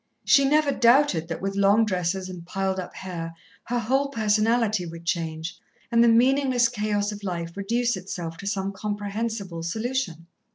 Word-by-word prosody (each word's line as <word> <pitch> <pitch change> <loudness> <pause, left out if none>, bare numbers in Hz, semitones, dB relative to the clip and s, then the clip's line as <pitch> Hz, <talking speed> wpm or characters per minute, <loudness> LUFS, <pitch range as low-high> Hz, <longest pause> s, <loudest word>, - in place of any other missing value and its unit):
She 275 - +5
never 300 +1 +3
doubted 235 - +4
that 165 +2 -5
with 195 0 -1
long 200 +3 +4
dresses 185 -1 -1
and 180 -2 -8
piled 190 +2 -2
up 180 - -7
hair, 165 -3 -6 0.3
her 245 - -1
whole 265 +5 +1
personality 220 -3 +2
would 165 0 -9
change, 165 0 -3 0.3
and 235 0 +5
the - - +5
meaningless 250 +1 +4
chaos 210 -2 -1
of 205 0 -8
life 170 -4 -4
reduce 235 +4 0
itself 175 -3 -6
to 200 - -7
some 195 -1 -1
comprehensible 205 -2 -4
solution. 205 -2 -3
205 Hz, 160 wpm, -25 LUFS, 180-235 Hz, 0.3 s, She